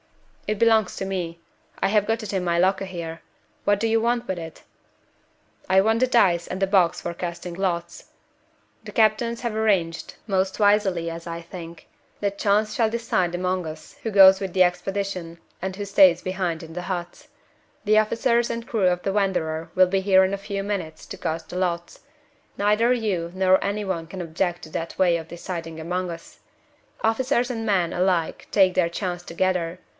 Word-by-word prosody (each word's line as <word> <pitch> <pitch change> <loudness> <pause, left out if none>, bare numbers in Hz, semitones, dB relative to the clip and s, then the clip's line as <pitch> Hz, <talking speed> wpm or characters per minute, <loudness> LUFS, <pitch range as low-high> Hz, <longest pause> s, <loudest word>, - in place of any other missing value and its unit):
"It 215 -1 -1
belongs 225 -4 +3
to 195 - -3
me. 175 -3 -4 0.4
I - - +3
have 210 0 +3
got 225 +1 -1
it 205 - -5
in 190 -2 0
my 170 -1 +1
locker 190 +2 +2
here. 170 -3 -6 0.4
What 205 -1 +2
do 225 - +1
you 225 0 +2
want 240 +1 0
with 190 - -2
it?" 160 -1 -9 1.1
"I 190 - +5
want 220 +4 +2
the 255 - +4
dice 185 -9 +3
and 185 - -5
the 195 - +3
box 185 -4 +3
for 170 - -4
casting 175 0 -5
lots. 170 -2 -3 0.7
The - - -9
captains 230 +1 +2
have 235 -3 -3
arranged 190 -7 0
most 190 -1 0
wisely, 205 -5 +2
as 165 0 -7
I 170 0 -4
think 170 -1 -10 0.3
that 200 -1 -2
Chance 210 +1 +2
shall 225 -2 +2
decide 220 -6 -1
among 180 0 -1
us 155 0 -10
who 225 - -1
goes 195 -1 +8
with 190 -2 -3
the 185 -1 +5
expedition 180 -1 -2 0.2
and 190 +1 -3
who 205 +1 -5
stays 190 -3 +5
behind 185 -3 -2
in 165 0 -10
the 180 - -4
huts. 175 -1 -6 0.6
The 215 +1 +5
officers 235 +2 +1
and 230 0 -4
crew 210 -5 +1
of 180 0 0
the 195 - -1
Wanderer 165 -6 -1
will 185 0 +6
be 190 +1 0
here 190 -1 +5
in 190 - -2
a - - -1
few 195 -1 -2
minutes 180 -6 -4
to - - -8
cast 160 +1 -4
the 180 - -5
lots. 175 -2 -2 0.6
Neither 210 +4 +3
you 200 -9 -1
nor 185 0 +3
any 205 +1 -2
one 175 -4 -2
can 185 +3 -8
object 175 +1 -2
to - - -9
that 165 +1 -5
way 180 -2 +4
of 165 -1 -5
deciding 165 -2 -6
among 180 +3 -2
us. 165 -1 -10 0.6
Officers 245 +2 +1
and 225 -2 -4
men 190 -5 +1
alike 180 -2 0
take 190 -2 +4
their 175 -2 +2
chance 175 0 -4
together. 180 0 -1
190 Hz, 190 wpm, -24 LUFS, 170-205 Hz, 1.1 s, goes